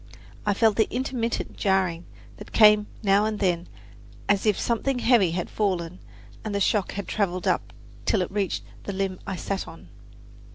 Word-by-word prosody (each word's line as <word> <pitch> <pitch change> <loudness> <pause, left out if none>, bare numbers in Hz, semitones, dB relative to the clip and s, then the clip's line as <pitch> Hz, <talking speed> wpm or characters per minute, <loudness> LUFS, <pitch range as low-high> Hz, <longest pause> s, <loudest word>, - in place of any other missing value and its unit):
I 205 - +3
felt 220 -1 +3
the 220 - +2
intermittent 245 -2 -2
jarring 185 -4 0 0.3
that - - -11
came 210 -1 +6 0.2
now 200 0 +4
and 215 -1 -1
then, 180 -4 0 0.6
as 205 +1 +2
if 210 - +2
something 245 +3 0
heavy 235 -7 +4
had 175 +1 -2
fallen 180 -4 -2 0.4
and 215 -2 -3
the - - +1
shock 200 0 +1
had 200 -1 -5
traveled 185 -4 -1
up - - 0 0.4
till 200 -4 +3
it 180 - -6
reached 190 - -1 0.2
the 200 - -3
limb 190 -1 -2
I 190 - -2
sat 195 +2 -3
on. 165 - -12
200 Hz, 170 wpm, -25 LUFS, 185-215 Hz, 0.6 s, came